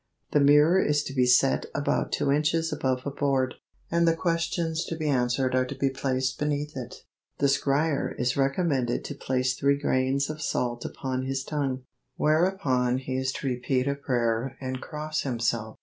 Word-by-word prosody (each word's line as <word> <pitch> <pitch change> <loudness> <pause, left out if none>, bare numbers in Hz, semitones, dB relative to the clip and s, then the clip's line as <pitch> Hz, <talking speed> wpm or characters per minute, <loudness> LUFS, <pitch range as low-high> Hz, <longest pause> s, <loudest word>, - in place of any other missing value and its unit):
The 150 - +4
mirror 150 +6 +5
is 150 0 +1
to 135 - -6
be 125 -2 +2
set 130 +2 +3
about 145 - 0
two 140 - +1
inches 155 +2 +1
above 130 -3 -1
a 140 - -2
board, 135 -2 0 0.4
and 170 0 +3
the 165 - +4
questions 165 -1 -1
to 165 - -4
be 155 -1 -3
answered 130 -1 +1
are 130 0 +2
to 140 - -6
be 135 0 0
placed 130 0 -1
beneath 150 0 -2
it. 125 -3 -7 0.3
The - - +1
scryer 140 +2 +1
is 125 +1 +1
recommended 135 -3 0
to - - -4
place 130 -2 0
three 140 +2 +2
grains 135 0 +1
of 155 0 -6
salt 120 -4 -2
upon 130 -1 -3
his 135 0 -2
tongue, 135 -3 -2 0.3
whereupon 150 -7 +2
he 130 0 -4
is 130 0 0
to - - -4
repeat 130 +1 0
a 140 - +2
prayer 125 -2 -1
and 130 -1 -4
cross 155 0 -3
himself. 115 -3 -2
135 Hz, 180 wpm, -27 LUFS, 130-150 Hz, 0.4 s, mirror